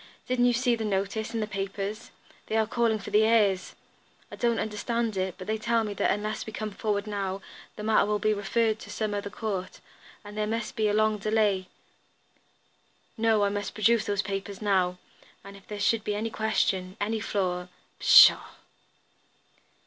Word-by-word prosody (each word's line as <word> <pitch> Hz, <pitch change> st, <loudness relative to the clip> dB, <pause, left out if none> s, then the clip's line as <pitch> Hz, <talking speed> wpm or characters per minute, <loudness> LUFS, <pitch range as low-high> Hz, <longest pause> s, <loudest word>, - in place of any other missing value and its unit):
"Didn't 250 Hz, -1 st, +2 dB
you 245 Hz, -, +4 dB
see 245 Hz, 0 st, +2 dB
the 225 Hz, -, -4 dB
notice 200 Hz, +1 st, -2 dB
in 225 Hz, -, 0 dB
the -, -, 0 dB
papers? 195 Hz, +1 st, -5 dB, 0.4 s
They 220 Hz, -, 0 dB
are 220 Hz, -, +3 dB
calling 230 Hz, 0 st, +1 dB
for 210 Hz, -, -9 dB
the 210 Hz, +1 st, +5 dB
heirs. 210 Hz, -4 st, +2 dB, 0.6 s
I -, -, -7 dB
don't 235 Hz, -1 st, +1 dB
understand 220 Hz, +1 st, -2 dB
it, 185 Hz, -1 st, -2 dB
but 185 Hz, -, -8 dB
they 220 Hz, +2 st, -2 dB
tell 230 Hz, +1 st, +1 dB
me 210 Hz, -1 st, -4 dB
that -, -, 0 dB
unless 215 Hz, +2 st, -2 dB
we -, -, -5 dB
come 215 Hz, 0 st, -4 dB
forward 205 Hz, 0 st, -2 dB
now, 195 Hz, -2 st, -3 dB, 0.4 s
the 210 Hz, -, -7 dB
matter 215 Hz, -1 st, +3 dB
will 210 Hz, 0 st, +1 dB
be 215 Hz, +1 st, +1 dB
referred 220 Hz, +2 st, 0 dB
to -, -, -11 dB
some 215 Hz, -2 st, -2 dB
other 205 Hz, 0 st, -3 dB
court, 200 Hz, -4 st, -4 dB, 0.5 s
and 205 Hz, 0 st, -10 dB
then 210 Hz, 0 st, -1 dB
there 225 Hz, -, 0 dB
must 230 Hz, -, -6 dB
be 215 Hz, -1 st, +1 dB
a 205 Hz, -, +1 dB
long 215 Hz, 0 st, +2 dB
delay. 205 Hz, -3 st, +1 dB, 1.5 s
No, 220 Hz, -2 st, +2 dB
I 200 Hz, -, +2 dB
must 205 Hz, -1 st, -4 dB
produce 225 Hz, +1 st, +3 dB
those 200 Hz, -1 st, 0 dB
papers 195 Hz, 0 st, -5 dB
now, 185 Hz, -4 st, +1 dB, 0.5 s
and 200 Hz, 0 st, -11 dB
if 195 Hz, -, -16 dB
there 210 Hz, -1 st, -6 dB
should 220 Hz, +1 st, +2 dB
be 210 Hz, -, -2 dB
any 220 Hz, +2 st, -3 dB
question, 195 Hz, -3 st, 0 dB
any 220 Hz, +2 st, -1 dB
flaw 180 Hz, -4 st, -2 dB, 0.2 s
" -, -, -39 dB
"Pshaw!" -, -, +7 dB
210 Hz, 190 wpm, -27 LUFS, 200-220 Hz, 1.5 s, Pshaw